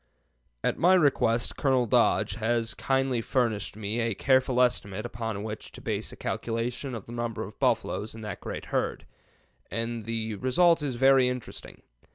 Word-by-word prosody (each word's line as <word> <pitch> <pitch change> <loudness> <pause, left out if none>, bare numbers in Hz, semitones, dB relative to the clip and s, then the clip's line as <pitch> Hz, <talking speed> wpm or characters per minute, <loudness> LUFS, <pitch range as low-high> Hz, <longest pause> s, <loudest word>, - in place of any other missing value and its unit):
At - - 0
my 185 +2 +6
request 120 -8 +2
Colonel 130 -3 +2
Dodge 110 - +3
has 115 +1 0
kindly 135 -2 0
furnished 115 -5 -1
me 105 +2 -3
a 115 -3 0
careful 130 0 +2
estimate 110 -4 +1
upon 110 -3 -4
which 110 -1 -6
to - - -10
base - - -3
a - - -10
calculation 120 +3 -3
of 110 - -7
the - - -11
number 120 -2 -3
of - - -10
buffaloes 110 +2 0
in 110 - -9
that 105 -3 -6
great - - -5
herd, - - -1 0.6
and 115 -1 -3
the 110 -2 -2
result 165 - +3
is 140 -4 -2
very 135 0 +5
interesting. 125 -2 -7
120 Hz, 165 wpm, -28 LUFS, 110-130 Hz, 0.6 s, my